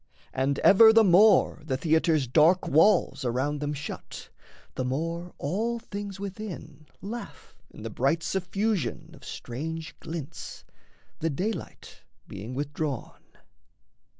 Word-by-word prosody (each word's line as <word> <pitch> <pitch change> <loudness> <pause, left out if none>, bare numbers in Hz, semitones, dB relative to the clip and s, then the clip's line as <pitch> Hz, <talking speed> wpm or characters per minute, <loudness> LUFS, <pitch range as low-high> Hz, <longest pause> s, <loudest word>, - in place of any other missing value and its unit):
And 135 +1 0
ever 220 +3 +8
the 225 0 +6
more 195 -2 +5
the 135 -4 -2
theatre's 160 0 +2
dark 160 +8 +4
walls 165 -1 +3
Around 130 +4 -1
them 145 0 -2
shut, 145 0 -7 0.4
the 130 - -3
more 165 +7 -3
all 220 +10 -1
things 200 -3 -7
within 185 -7 -8 0.2
Laugh 230 +4 -8
in - - -12
the - - -5
bright 165 0 0
suffusion 190 - -2
of - - -16
strange 160 +6 -6
glints, 160 -4 -7 0.5
The 165 - 0
daylight 195 +9 -5 0.3
being 105 +6 -7
withdrawn. 145 -1 -4
160 Hz, 120 wpm, -27 LUFS, 145-195 Hz, 0.5 s, ever